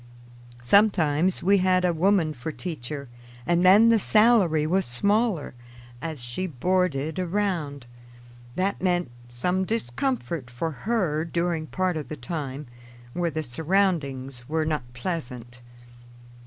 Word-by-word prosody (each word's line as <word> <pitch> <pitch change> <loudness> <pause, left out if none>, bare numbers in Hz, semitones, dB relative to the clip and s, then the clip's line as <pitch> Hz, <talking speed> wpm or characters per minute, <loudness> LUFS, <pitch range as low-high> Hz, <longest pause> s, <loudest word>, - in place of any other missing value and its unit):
Sometimes 180 - +3
we 200 +2 +4
had 185 0 +3
a 175 - +2
woman 170 -1 +2
for 140 +4 -6
teacher, 145 -4 -6 0.4
and 175 +1 +2
then 205 +5 +7
the 230 -1 +5
salary 210 -8 +4
was 190 +5 +2
smaller, 200 - 0 0.5
as 155 -6 -5
she 120 +11 -3
boarded 160 0 0
around. 175 -8 -2 0.7
That 190 0 -1
meant 175 -6 0 0.2
some 180 +11 -1
discomfort 185 - -2
for 125 +7 -3
her 175 -4 -1
during 170 -1 -2
part 185 -1 -1
of 150 - -5
the 155 - -5
time, 145 +1 -5 0.5
where 175 -1 0
the 155 0 -3
surroundings 140 -5 -1
were 160 0 0
not 150 -6 -3
pleasant. 125 -5 -5
165 Hz, 125 wpm, -25 LUFS, 145-185 Hz, 0.7 s, then